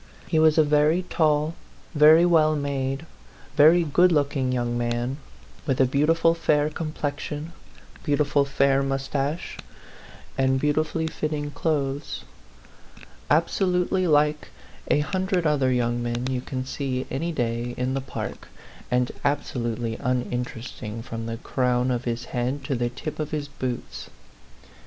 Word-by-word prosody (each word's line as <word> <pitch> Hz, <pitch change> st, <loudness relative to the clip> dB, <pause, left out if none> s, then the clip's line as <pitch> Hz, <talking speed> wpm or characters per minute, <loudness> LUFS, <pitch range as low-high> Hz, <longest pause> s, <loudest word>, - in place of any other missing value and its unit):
He 160 Hz, -, +1 dB
was 155 Hz, 0 st, +5 dB
a 155 Hz, -, +7 dB
very 150 Hz, +4 st, +3 dB
tall, 155 Hz, -1 st, +2 dB, 0.4 s
very 155 Hz, +2 st, +7 dB
well 155 Hz, -3 st, +4 dB
made, 140 Hz, 0 st, -2 dB, 0.5 s
very 165 Hz, +4 st, +6 dB
good 175 Hz, +4 st, +4 dB
looking 140 Hz, -4 st, +1 dB
young 120 Hz, -1 st, -1 dB
man, 120 Hz, +2 st, -1 dB, 0.5 s
with 135 Hz, -2 st, 0 dB
a 130 Hz, -, +6 dB
beautiful 160 Hz, +5 st, +3 dB
fair 155 Hz, -2 st, +1 dB
complexion, 150 Hz, 0 st, -4 dB, 0.5 s
beautiful 145 Hz, -1 st, +2 dB
fair 140 Hz, 0 st, +2 dB
moustache, 135 Hz, +3 st, -2 dB, 0.8 s
and 130 Hz, 0 st, +3 dB
beautifully 155 Hz, +3 st, 0 dB
fitting 150 Hz, -2 st, -3 dB
clothes; 145 Hz, -2 st, -2 dB, 1.1 s
absolutely 180 Hz, +3 st, +2 dB
like 150 Hz, -1 st, +2 dB, 0.4 s
a 150 Hz, -, +3 dB
hundred 185 Hz, +2 st, -1 dB
other 140 Hz, -4 st, +2 dB
young 120 Hz, -1 st, 0 dB
men 120 Hz, +1 st, -2 dB
you 125 Hz, -1 st, -1 dB
can 130 Hz, 0 st, -4 dB
see 130 Hz, -1 st, -3 dB
any 165 Hz, +5 st, -2 dB
day 120 Hz, -3 st, -2 dB
in 125 Hz, +1 st, -1 dB
the 135 Hz, -, -1 dB
park, 130 Hz, -, -6 dB, 0.4 s
and 125 Hz, 0 st, +1 dB
absolutely 120 Hz, -5 st, -1 dB
uninterest 125 Hz, -2 st, -3 dB
ing 110 Hz, 0 st, -5 dB
from 115 Hz, -1 st, -6 dB
the 115 Hz, 0 st, -4 dB
crown 125 Hz, 0 st, 0 dB
of 125 Hz, 0 st, -2 dB
his 120 Hz, 0 st, -2 dB
head 130 Hz, +3 st, -1 dB
to 140 Hz, +1 st, -2 dB
the 120 Hz, -1 st, 0 dB
tip 150 Hz, +6 st, -7 dB
of 155 Hz, -1 st, -2 dB
his 150 Hz, -2 st, -3 dB
boots. 130 Hz, -3 st, -5 dB
140 Hz, 135 wpm, -25 LUFS, 125-155 Hz, 1.1 s, a